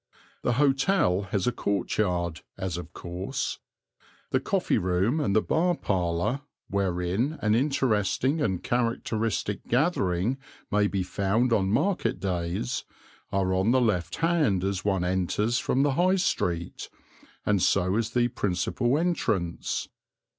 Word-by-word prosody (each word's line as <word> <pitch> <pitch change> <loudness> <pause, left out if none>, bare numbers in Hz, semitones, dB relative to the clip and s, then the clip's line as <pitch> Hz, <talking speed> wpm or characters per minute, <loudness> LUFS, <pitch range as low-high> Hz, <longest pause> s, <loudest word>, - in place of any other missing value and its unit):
The 120 - +1
hotel 135 - +2
has 100 -3 0
a 125 - +2
courtyard, 90 -6 -1 0.2
as 95 -3 -3
of 90 - -7
course. 90 +2 -4 0.7
The - - +3
coffee - - +1
room 95 - +1
and 120 -10 0
the 110 - +4
bar 175 +2 +2
parlour, 90 - -1 0.3
wherein 100 - 0
an 105 0 +2
interesting 130 +2 +1
and 95 -10 0
characteristic 115 -3 -1
gathering 120 - +1 0.3
may 105 0 +3
be 95 -2 -1
found 105 +6 +1
on 95 -4 +2
market 180 - +1
days, 85 -7 -2 0.5
are 95 -1 +1
on 95 +4 +2
the 130 +2 +4
left 90 -8 0
hand 155 - +2
as 95 -2 -1
one 95 -3 +1
enters 95 +6 0
from 135 - +1
the 145 - +3
High 180 +6 +3
Street, 85 - -1 0.6
and 100 -3 +2
so 95 +1 +2
is 115 0 0
the 120 +1 +2
principal 120 +5 0
entrance. 110 - -1
105 Hz, 130 wpm, -27 LUFS, 90-125 Hz, 0.7 s, the